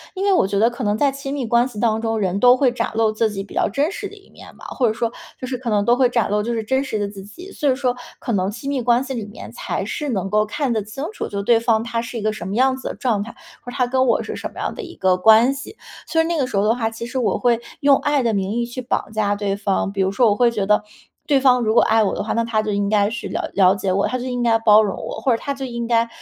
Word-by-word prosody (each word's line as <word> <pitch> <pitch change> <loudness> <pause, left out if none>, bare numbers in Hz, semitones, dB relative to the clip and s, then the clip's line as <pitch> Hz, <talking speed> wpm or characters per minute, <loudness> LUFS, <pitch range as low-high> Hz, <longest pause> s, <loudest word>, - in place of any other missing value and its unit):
因 385 +1 -2
为 400 - +4
我 275 - +3
觉 200 +1 -2
得 220 +3 +4
可 245 +1 -6
能 205 0 +1
在 280 +3 +2
亲 275 0 -6
密 270 -4 -2
关 235 +2 +2
系 230 -5 -9
当 220 -1 +1
中， 225 -1 -1
人 195 -2 -1
都 245 +3 +6
会 255 -2 +3
展 240 -1 -2
露 225 -1 +2
自 220 +1 0
己 195 -2 -5
比 200 - -14
较 - - +1
真 285 - 0
实 405 -1 -6
的 - - -13
一 395 - -19
面 - - -15
吧， - - -13
或 250 - 0
者 215 - +1
说 230 +1 -2 0.3
就 - - -5
是 255 -1 -4
可 245 -2 -4
能 205 -2 +1
都 240 - +4
会 250 -1 +3
展 235 -4 0
露 210 0 +1
就 235 +2 -2
是 225 - -2
真 265 +5 0
实 245 -5 -3
的 205 -1 -1
自 200 -1 -9
己。 350 - -12
所 295 -6 -1
以 - - +1
说 255 -2 -1 0.2
可 - - -5
能 190 -3 0
亲 230 +6 -8
密 280 -2 -1
关 240 +1 +2
系 270 0 -5
里 225 -5 -5
面 205 - -10
才 - - -4
是 295 -1 -4
能 195 -6 -1
够 210 +2 +2
看 280 0 -1
得 220 - 0
清 215 +8 -6
楚 - - -4
就 200 -1 -4
对 230 +2 +4
方 225 -1 +1
他 230 0 -2
是 235 +1 -6
一 220 - -4
个 215 0 0
什 185 -4 -7
么 195 - -3
样 260 +2 +3
子 260 - -7
的 - - -5
状 230 -6 0
态， 225 +3 -7 0.3
或 245 - -8
是 265 - -8
他 250 - +3
跟 260 +1 +1
我 - - +2
是 - - -6
什 - - -6
么 - - -11
样 - - -2
的 - - -7
一 350 -5 -10
个 185 -1 +2
关 220 +6 +5
系。 280 +10 -9 0.3
所 325 - 0
以 325 - +3
那 340 +1 -1
个 265 - +1
时 205 - -3
候 200 - +2
的 215 +2 +3
话， 230 -2 -1
其 225 +1 -7
实 250 +2 -3
我 240 - +1
会 235 -2 +2 0.2
用 280 -1 +6
爱 290 -2 0
的 230 -2 +1
名 195 -2 -1
义 235 +1 -1
去 245 +2 -6
绑 245 -3 -2
架 210 -2 0
对 200 -1 -2
方， 195 -1 -1
比 195 -1 -2
如 190 0 +1
说 235 +1 +4
我 205 - +2
会 240 +2 +4
觉 210 -4 -2
得 210 +1 +3 0.5
对 285 - +4
方 250 -2 +4
如 220 -2 +1
果 - - +6
爱 225 +1 +3
我 200 - -1
的 - - -3
话， - - -4
那 230 - +1
他 225 -2 0
就 215 0 -3
应 200 0 0
该 205 -1 +2
是 230 0 -5
了 - - -4
了 190 -1 +4
解 195 -1 -2
我， 195 +2 +1
他 255 - -2
就 245 - -6
应 250 -1 -3
该 230 -1 +4
包 215 -1 +6
容 200 - -2
我， - - -5
或 250 +4 +1
者 - - -3
他 280 - -2
就 270 -1 -6
应 235 -2 -4
该 230 -1 +2
230 Hz, 350 characters per minute, -20 LUFS, 210-255 Hz, 0.5 s, 都